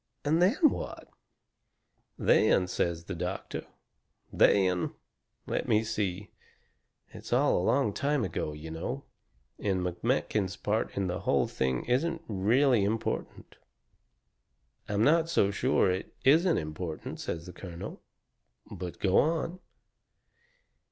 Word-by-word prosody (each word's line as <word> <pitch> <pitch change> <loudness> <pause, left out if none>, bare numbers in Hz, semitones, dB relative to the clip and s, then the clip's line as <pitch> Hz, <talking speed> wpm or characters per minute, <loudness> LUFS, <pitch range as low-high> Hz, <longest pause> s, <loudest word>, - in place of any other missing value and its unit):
"And 160 +4 +3
then 195 +9 +4
what?" - - -6 1.1
"Then," 90 - +4
says 85 -1 -1
the 95 - -6
doctor, 85 - -4 0.7
"then 90 -3 +3 0.5
let - - -2
me 110 +1 +3
see 105 -3 -3 0.8
it's - - -11
all - - +3
a - - +1
long 115 +2 +2
time 145 0 0
ago, 80 -3 -3
you 75 +2 -8
know, 120 +12 -4 0.6
and 95 -3 0
McMakin's 95 +1 -1
part 105 +3 -1
in 100 - +1
the 90 0 -2
whole - - +2
thing 65 -1 -1
isn't 165 +7 0
really 115 +4 +3
important." 110 +3 -3 1.3
"I'm 105 +1 +1
not 165 +3 +4
so 100 -11 +3
sure 100 -3 +2
it 95 +1 -4
isn't 165 +6 +5
important," 80 +1 -5
says 85 0 -4
the 90 - -9
colonel, 90 -2 -8 0.7
"but 90 -1 -6
go 95 -2 +3
on." 165 +3 0
100 Hz, 120 wpm, -29 LUFS, 90-135 Hz, 1.3 s, isn't